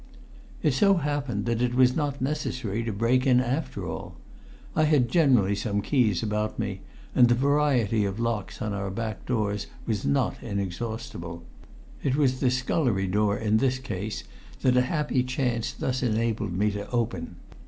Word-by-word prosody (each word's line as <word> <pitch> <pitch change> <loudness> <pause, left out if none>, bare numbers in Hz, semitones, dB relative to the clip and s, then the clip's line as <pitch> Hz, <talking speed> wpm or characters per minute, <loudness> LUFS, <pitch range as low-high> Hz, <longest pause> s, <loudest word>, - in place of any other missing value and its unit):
It 150 - +3
so 195 +9 +4
happened 145 - -1
that 115 0 0
it 125 0 +1
was 125 0 +5
not 145 -3 -1
necessary 130 -6 -2
to 115 - -1
break 115 +6 +2
in 125 -1 +5
after 130 +5 -2
all. - - -6 0.6
I 155 - +4
had 145 -6 +3
generally 125 - +4
some 100 0 -1
keys 115 - +2
about 105 0 -1
me - - -3 0.3
and 120 - +6
the 120 - +5
variety 130 -5 +2
of 100 +1 -2
locks 115 -4 -2
on 105 -1 -2
our 100 0 -3
back 110 +2 -5
doors 105 -4 -1 0.2
was 110 -4 -1
not 70 0 0
inexhaustible. 95 -4 -4 0.6
It 135 -2 +1
was 130 -3 +2
the 130 - +3
scullery 125 -5 +1
door 105 +2 +1
in 110 -1 +2
this 130 +2 +2
case 110 -5 -5 0.4
that 125 -1 +4
a 125 - +5
happy 145 0 0
chance 125 -2 -1
thus 130 -1 -2
enabled 110 -4 0
me 105 +4 +1
to 100 0 -5
open. 95 -9 -2
115 Hz, 165 wpm, -26 LUFS, 105-130 Hz, 0.6 s, and